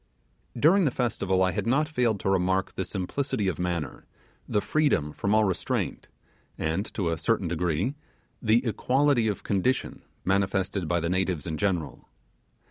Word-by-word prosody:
During 175 Hz, +8 st, +5 dB
the -, -, +4 dB
festival 100 Hz, -7 st, 0 dB
I 95 Hz, -, +2 dB
had 90 Hz, -, -3 dB
not 145 Hz, +6 st, +2 dB
failed 120 Hz, -9 st, 0 dB
to -, -, 0 dB
remark 95 Hz, 0 st, +1 dB
the 95 Hz, -, -3 dB
simplicity 100 Hz, +4 st, -2 dB
of 90 Hz, -, -2 dB
manner, 85 Hz, -5 st, -3 dB, 0.4 s
the 105 Hz, -, +2 dB
freedom 100 Hz, -, +1 dB
from 100 Hz, +1 st, 0 dB
all 110 Hz, -, +5 dB
restraint, 95 Hz, -4 st, -2 dB, 0.5 s
and, 80 Hz, +7 st, -2 dB
to 85 Hz, -5 st, 0 dB
certain 95 Hz, +3 st, 0 dB
degree, 85 Hz, -, 0 dB, 0.5 s
the 115 Hz, +2 st, +3 dB
equality 130 Hz, +1 st, +2 dB
of 105 Hz, -, -2 dB
condition 105 Hz, +6 st, 0 dB, 0.2 s
manifested 95 Hz, -1 st, 0 dB
by 85 Hz, +1 st, +1 dB
the 85 Hz, -, -1 dB
natives 90 Hz, -5 st, 0 dB
in 80 Hz, -, -3 dB
general. 85 Hz, -5 st, -2 dB
95 Hz, 150 wpm, -27 LUFS, 90-115 Hz, 0.5 s, During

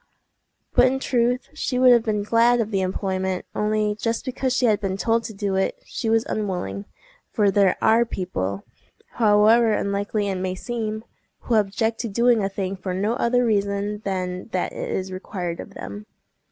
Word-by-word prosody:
But 255 Hz, -, +6 dB
in 265 Hz, +1 st, 0 dB
truth 250 Hz, -1 st, 0 dB
she 280 Hz, -4 st, -2 dB
would 255 Hz, 0 st, +6 dB
have 240 Hz, -1 st, +6 dB
been 215 Hz, -2 st, -1 dB
glad 230 Hz, +3 st, +3 dB
of 220 Hz, -1 st, -1 dB
the 195 Hz, -2 st, +1 dB
employment, 190 Hz, 0 st, -2 dB
only 210 Hz, 0 st, 0 dB
just 230 Hz, +2 st, -2 dB
because 260 Hz, 0 st, -2 dB
she 255 Hz, 0 st, +2 dB
had 215 Hz, -3 st, +2 dB
been 195 Hz, -1 st, -2 dB
told 230 Hz, +2 st, +1 dB
to -, -, -5 dB
do 195 Hz, -1 st, -2 dB
it, 190 Hz, -, 0 dB
she 225 Hz, -, -3 dB
was 225 Hz, 0 st, +2 dB
unwilling; 200 Hz, -1 st, -3 dB, 0.5 s
for 205 Hz, -2 st, +2 dB
there 195 Hz, -2 st, +3 dB
are 225 Hz, +2 st, +5 dB
people—however 210 Hz, -, +1 dB
unlikely 205 Hz, +1 st, -1 dB
it 190 Hz, -2 st, -2 dB
may 185 Hz, 0 st, -2 dB
seem—who 220 Hz, +2 st, -6 dB
object 220 Hz, +2 st, +1 dB
to 235 Hz, -, -2 dB
doing 235 Hz, +1 st, +3 dB
a 195 Hz, -, 0 dB
thing 195 Hz, -1 st, -3 dB
for 185 Hz, -1 st, -4 dB
no 205 Hz, +4 st, 0 dB
other 245 Hz, +1 st, +2 dB
reason 205 Hz, -1 st, 0 dB
than 185 Hz, -2 st, -3 dB
that 185 Hz, -, -1 dB
it -, -, -5 dB
is 190 Hz, 0 st, -3 dB
required 185 Hz, -2 st, -5 dB
of 200 Hz, -, -9 dB
them. 210 Hz, +1 st, -8 dB
210 Hz, 175 wpm, -23 LUFS, 190-230 Hz, 0.5 s, But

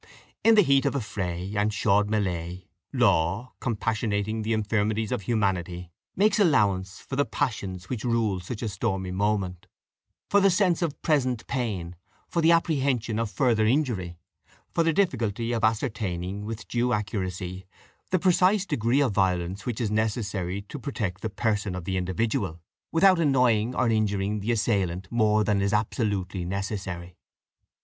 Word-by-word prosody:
In 225 Hz, 0 st, +6 dB
the 210 Hz, -, +7 dB
heat 140 Hz, -2 st, +3 dB
of 140 Hz, -, -1 dB
affray 95 Hz, -5 st, -3 dB
and 105 Hz, +1 st, +2 dB
chaude 105 Hz, 0 st, +2 dB
melée, 90 Hz, -4 st, -2 dB, 0.3 s
law, 95 Hz, +10 st, +1 dB
compassionating 110 Hz, -1 st, -1 dB
the 110 Hz, +1 st, -2 dB
infirmities 110 Hz, 0 st, 0 dB
of 125 Hz, -4 st, -1 dB
humanity, 90 Hz, -5 st, -1 dB, 0.2 s
makes 210 Hz, +2 st, +3 dB
allowance 100 Hz, -, +2 dB
for 135 Hz, -, -6 dB
the 145 Hz, -, +3 dB
passions 95 Hz, -9 st, -3 dB
which 120 Hz, -1 st, -4 dB
rule 115 Hz, -6 st, +1 dB
such 105 Hz, +6 st, -6 dB
a -, -, -1 dB
stormy 95 Hz, -2 st, -2 dB
moment 95 Hz, -2 st, -1 dB, 0.6 s
for 200 Hz, -, +4 dB
the 195 Hz, -, +5 dB
sense 180 Hz, -2 st, +2 dB
of 160 Hz, -4 st, -2 dB
present 130 Hz, -7 st, +1 dB
pain, 100 Hz, -10 st, -3 dB, 0.3 s
for 170 Hz, -, -1 dB
the 165 Hz, +1 st, +5 dB
apprehension 135 Hz, -9 st, +1 dB
of 115 Hz, -2 st, -1 dB
further 115 Hz, -3 st, +2 dB
injury, 110 Hz, -, 0 dB, 0.6 s
for 165 Hz, -, +2 dB
the 165 Hz, -, +3 dB
difficulty 120 Hz, -, 0 dB
of 115 Hz, -1 st, -1 dB
ascertaining 105 Hz, -4 st, -1 dB
with 115 Hz, +1 st, -6 dB
due 120 Hz, +1 st, 0 dB
accuracy 95 Hz, -3 st, -3 dB, 0.4 s
the 185 Hz, -, +3 dB
precise 185 Hz, +2 st, +3 dB
degree 120 Hz, -, +1 dB
of 135 Hz, -5 st, +2 dB
violence 95 Hz, +1 st, 0 dB
which 120 Hz, -3 st, -2 dB
is 110 Hz, -4 st, -1 dB
necessary 100 Hz, -4 st, -1 dB
to 145 Hz, +8 st, -8 dB
protect 105 Hz, -9 st, -4 dB
the 110 Hz, -, -2 dB
person 105 Hz, -2 st, -1 dB
of 90 Hz, -2 st, -6 dB
the 95 Hz, -, -2 dB
individual, 95 Hz, 0 st, -1 dB, 0.3 s
without 185 Hz, +2 st, +5 dB
annoying 125 Hz, -6 st, +2 dB
or -, -, +2 dB
injuring 105 Hz, -2 st, 0 dB
the 105 Hz, +4 st, -1 dB
assailant 95 Hz, -5 st, 0 dB
more 110 Hz, -2 st, +3 dB
than 105 Hz, -2 st, +1 dB
is 100 Hz, +1 st, 0 dB
absolutely 105 Hz, -4 st, -1 dB
necessary. 95 Hz, -2 st, -4 dB
105 Hz, 155 wpm, -26 LUFS, 95-125 Hz, 0.6 s, the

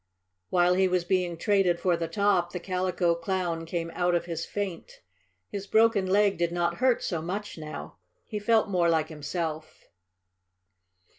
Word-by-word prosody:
While 180 Hz, 0 st, +4 dB
he 190 Hz, +1 st, +3 dB
was 180 Hz, -1 st, +1 dB
being 180 Hz, -1 st, 0 dB
traded 195 Hz, -3 st, +2 dB
for 180 Hz, -2 st, +2 dB
the 165 Hz, 0 st, -3 dB
top 185 Hz, -1 st, +1 dB
the 180 Hz, -, -3 dB
Calico 180 Hz, -1 st, 0 dB
Clown 170 Hz, -1 st, -2 dB
came 170 Hz, 0 st, -3 dB
out 175 Hz, 0 st, +1 dB
of 170 Hz, -, 0 dB
his 165 Hz, -1 st, -4 dB
faint. 200 Hz, -5 st, -5 dB, 0.5 s
His 200 Hz, -1 st, -6 dB
broken 220 Hz, -3 st, +3 dB
leg 200 Hz, -1 st, +3 dB
did 170 Hz, -1 st, +1 dB
not 175 Hz, 0 st, 0 dB
hurt 255 Hz, -2 st, +2 dB
so 170 Hz, -4 st, -2 dB
much 200 Hz, +5 st, -4 dB
now. 155 Hz, -1 st, -8 dB, 0.3 s
He 210 Hz, -, -4 dB
felt 220 Hz, +1 st, +3 dB
more 180 Hz, -4 st, +2 dB
like 160 Hz, -2 st, +1 dB
himself. 155 Hz, 0 st, -5 dB
180 Hz, 160 wpm, -27 LUFS, 170-195 Hz, 0.5 s, While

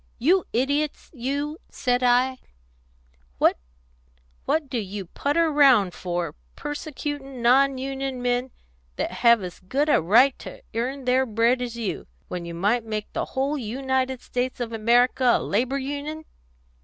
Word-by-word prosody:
You 345 Hz, +9 st, +3 dB
idiots, 285 Hz, +5 st, -1 dB
you,' 285 Hz, +4 st, -3 dB
said 245 Hz, -1 st, 0 dB
I, 250 Hz, +1 st, +3 dB, 1.0 s
'what 65 Hz, -, +3 dB, 1.1 s
do 255 Hz, -3 st, -2 dB
you 200 Hz, -1 st, -5 dB
putter 310 Hz, -, 0 dB
round 260 Hz, -11 st, +5 dB
for, 175 Hz, -3 st, -3 dB, 0.2 s
persecuting 290 Hz, -3 st, -5 dB
non 270 Hz, +3 st, +4 dB
union 270 Hz, 0 st, -4 dB
men, 245 Hz, +1 st, 0 dB, 0.5 s
that -, -, -2 dB
have 235 Hz, -4 st, +4 dB
as 180 Hz, -2 st, -7 dB
good 275 Hz, +11 st, -1 dB
a -, -, +4 dB
right 240 Hz, +10 st, +5 dB
to -, -, -10 dB
earn 255 Hz, +4 st, -3 dB
their 260 Hz, +1 st, +2 dB
bread 230 Hz, +3 st, +2 dB
as 240 Hz, -1 st, -4 dB
you, 225 Hz, -4 st, -4 dB, 0.2 s
when 175 Hz, -1 st, -4 dB
you 170 Hz, 0 st, -6 dB
might 210 Hz, +7 st, +1 dB
make 215 Hz, -1 st, -5 dB
the -, -, -1 dB
whole 280 Hz, +3 st, 0 dB
United 260 Hz, +2 st, -2 dB
States 250 Hz, +1 st, -3 dB
of 235 Hz, -2 st, -4 dB
America 240 Hz, +3 st, +3 dB
a -, -, -4 dB
Labour 250 Hz, +6 st, 0 dB
Union?' 290 Hz, +3 st, -5 dB
255 Hz, 145 wpm, -24 LUFS, 230-275 Hz, 1.1 s, round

